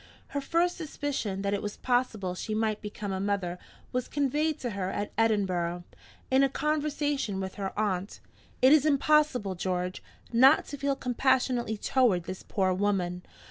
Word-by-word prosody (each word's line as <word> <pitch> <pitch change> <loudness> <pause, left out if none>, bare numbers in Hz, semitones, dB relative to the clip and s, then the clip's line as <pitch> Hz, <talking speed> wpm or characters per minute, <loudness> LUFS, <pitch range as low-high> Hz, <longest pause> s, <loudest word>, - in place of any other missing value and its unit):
Her 285 - -2
first 340 +5 +1
suspicion 280 - -3
that 200 0 0
it 200 - -1
was 205 0 -5
possible 235 -7 0
she 215 +4 -4
might 215 -1 0
become 210 -1 -5
a 190 - -2
mother 190 -3 -1 0.3
was 250 0 -2
conveyed 295 +2 0
to 245 - -2
her 195 -2 -2
at 205 +1 -3
Edinburgh, 185 -6 +1 0.5
in 265 +1 +5
a 275 - +4
conversation 290 -6 -1
with 190 -1 -4
her 195 - -2
aunt. 200 -2 -1 0.4
It 260 +3 +8
is 305 -3 +6
impossible, 290 -7 +3
George, 180 0 -2 0.3
not 265 +6 +6
to 285 - -5
feel 280 0 0
compassionately 250 -3 +1
toward 215 -6 +2
this 185 +2 -6
poor 190 -2 0
woman. 185 -2 0
220 Hz, 160 wpm, -28 LUFS, 190-275 Hz, 0.5 s, It